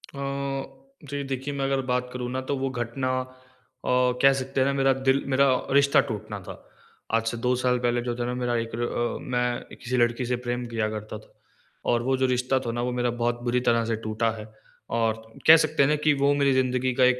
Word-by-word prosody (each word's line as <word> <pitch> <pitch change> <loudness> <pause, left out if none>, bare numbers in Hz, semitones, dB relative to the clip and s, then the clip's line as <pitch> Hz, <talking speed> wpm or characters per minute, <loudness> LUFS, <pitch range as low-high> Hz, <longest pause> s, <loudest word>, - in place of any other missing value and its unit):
अ, 140 - -4 0.9
जी 145 0 -3
देखिए 135 +1 -4
मैं 135 -1 -1
अगर 135 0 +1
बात 125 0 0
करूँ 125 -1 -4
ना 130 - -2
तो 140 - +1
वो 135 0 -1
घटना 130 +1 -2
अ, 130 0 -11 0.3
कह 135 0 +7
सकते 135 0 -2
हैं 130 - +3
ना 140 - +1
मेरा 135 -1 +3
दिल 135 +1 +3
मेरा 140 +1 +5 0.3
रिश्ता 140 0 +5
टूटना 105 -1 -5
था। 95 0 -8 0.6
आज 115 0 +2
से 120 - -2
2 125 0 +3
साल 125 -1 +2
पहले 120 0 +1
जो 120 0 -3
था 120 - -2
ना 125 - -2
मेरा 120 -1 0
एक 115 -1 -3
ल 120 - -3
अ, 120 0 -2
मैं 125 -1 -2
किसी 125 +1 -3
लड़की 120 +1 +2
से 125 +1 0
प्रेम 120 0 -2
किया 110 -2 0
करता 110 0 -6
था। - - -21 0.6
और 120 -1 +2
वो 130 +1 +1
जो 130 - +2
रिश्ता 125 +1 +1
था 115 - -1
ना 120 +1 -3
वो 125 - -1
मेरा 120 0 +1
बहुत 120 0 0
बुरी 125 0 +1
तरह 115 -1 +2
से 115 0 0
टूटा 110 +1 0
है 105 - -7 0.5
और 110 -1 0 0.3
कह 160 +1 +11
सकते 155 -2 +2
हैं 135 - +3
ना 150 - +3
कि 150 - +5
वो 140 0 +2
मेरी 140 -1 +3
ज़िंदगी 130 -1 +1
का - - +6
एक 125 0 +3
125 Hz, 235 wpm, -26 LUFS, 120-135 Hz, 0.9 s, कह